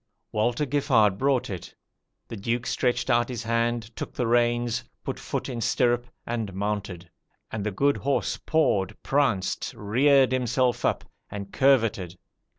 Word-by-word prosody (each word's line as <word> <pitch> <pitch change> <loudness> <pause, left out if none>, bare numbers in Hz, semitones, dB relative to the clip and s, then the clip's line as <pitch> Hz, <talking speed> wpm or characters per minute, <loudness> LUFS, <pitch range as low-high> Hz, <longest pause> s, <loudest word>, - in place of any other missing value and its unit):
Walter 120 +6 +1
Giffard 125 -8 +2
brought 135 -2 +2
it. 95 -4 -7 0.5
The - - -7
Duke 115 +4 -2
stretched 125 0 0
out 120 +1 +2
his 120 -1 -4
hand, 115 0 -1
took - - -6
the 125 - 0
reins, 120 0 +1 0.2
put - - -4
foot - - -4
in 120 -3 -4
stirrup, 120 +1 +1 0.2
and 115 -5 -3
mounted; 100 -4 -3 0.4
and 110 -2 -3
the 105 - 0
good 140 +8 +1
horse 140 +1 -1
pawed, 105 - +1
pranced, 130 -10 0
reared 130 +5 +4
himself 125 0 +1
up, - - +1 0.3
and 100 -1 -7
curvetted. 115 -10 +2
120 Hz, 145 wpm, -26 LUFS, 105-130 Hz, 0.5 s, reared